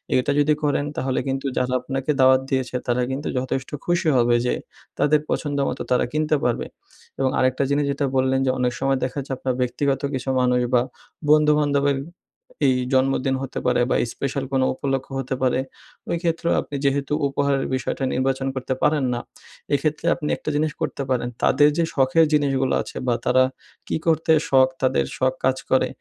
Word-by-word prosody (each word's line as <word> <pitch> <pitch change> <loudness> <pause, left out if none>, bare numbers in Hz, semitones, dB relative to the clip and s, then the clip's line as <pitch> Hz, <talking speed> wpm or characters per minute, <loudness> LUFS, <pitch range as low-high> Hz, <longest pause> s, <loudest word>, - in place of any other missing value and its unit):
এটা 130 +3 +2
যদি 150 +1 +4
করেন, 145 -1 +1
তাহলে 130 -1 0
কিন্তু 135 +1 -2
যারা 125 0 0
আপনাকে 135 +2 -2
দাওয়াত 130 0 +6
দিয়েছে, 130 -2 -1
তারা 120 +1 +1
কিন্তু 140 +3 -3
যথেষ্ট 130 0 -2 0.2
খুশি 175 -1 +1
হবে, 120 0 +3
যে, 125 - +1 0.5
তাদের 150 +1 +4
পছন্দ 145 -2 -1
মতো 130 - -5
তারা 125 - +3
কিনতে 155 0 +1
পারবে। 120 -1 0 0.5
এবং 135 -1 +2
আরেকটা 130 +1 +2
জিনিস 145 +1 +1
যেটা 140 0 -1
বললেন, 130 0 +2
যে, 130 - +3
অনেক 125 -1 +1
সময় 135 0 +1
দেখা 130 +2 -3
যাচ্ছে 135 0 -4
আপনার 130 -1 -1
ব্যক্তিগত 135 +2 0
কিছু 130 0 -3
মানুষ, 125 0 +2
বা 120 - +5 0.5
বন্ধুবান্ধবের 150 -2 +3 0.7
এই 130 - +3 0.2
জন্মদিন 135 0 +2
হতে 135 - -4
পারে, 125 -1 +2
বা - - +2 0.2
স্পেশাল 140 0 -3
কোনো 130 -1 +3
উপলক্ষ্য 135 0 -3
হতে 130 0 -3
পারে, 130 -1 +2 0.5
ওই 170 - 0
ক্ষেত্রেও 170 0 0
আপনি 145 - -8
যেহেতু 140 +1 0
উপহারের 140 0 0
বিষয়টা 130 +1 -3
নির্বাচন 135 +1 0
করতে 130 0 -2
পারেন 150 -2 +3
না। 120 - -2 0.5
এক্ষেত্রে 150 +3 0
আপনি 150 -3 -4
একটা - - -5
জিনিস 155 +1 +1
করতে 140 - -2
পারেন। 125 -1 0
তাদের 145 0 +5
যে, 170 - +3
শখের 135 +4 +4
জিনিসগুলা 135 -3 +2
আছে - - -9
বা 120 - +3
তারা 130 +1 +4 0.4
কি - - -1
করতে 160 0 +2 0.2
শখ, 130 -1 +5
তাদের 125 - +2
শখ 130 0 +1
কাজ 130 0 +2
করে, 130 - +4
135 Hz, 180 wpm, -23 LUFS, 130-145 Hz, 0.7 s, দাওয়াত